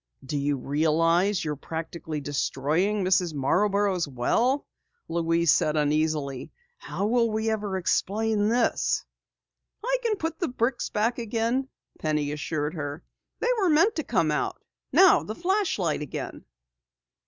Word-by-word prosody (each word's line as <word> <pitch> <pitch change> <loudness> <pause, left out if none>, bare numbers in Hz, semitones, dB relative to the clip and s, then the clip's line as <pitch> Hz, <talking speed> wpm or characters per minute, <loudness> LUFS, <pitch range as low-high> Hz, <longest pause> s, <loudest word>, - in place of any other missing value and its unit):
"Do 140 - -4
you 145 0 0
realize 165 +7 +2
you're 150 -1 -2
practically 160 0 -5
destroying 150 +8 0
Mrs. 180 -3 +2
Marborough's 190 +5 +1
well!" 230 - +1 0.4
Louise 165 -1 +2
said 155 0 +1
uneasily. 150 -3 0 0.3
"How 200 - -3
will 230 +1 +2
we 220 +1 0
ever 205 -3 -2
explain 210 +3 +1
this?" 235 +1 +1 0.8
"I - - +2
can 460 -3 +1
put 325 -3 -4
the 345 - 0
bricks 245 0 -1
back 230 +4 0
again," 235 +4 -1 0.3
Penny 150 -2 0
assured 150 0 -2
her. 145 -1 -5 0.4
"They 475 - +1
were 380 -3 +3
meant 330 +8 +4
to 315 - -1
come 175 - +1
out. 150 - -1 0.3
Now, 380 -1 +6
the 215 - -6
flashlight 350 - 0
again." 150 - -6
185 Hz, 130 wpm, -26 LUFS, 150-230 Hz, 0.8 s, Now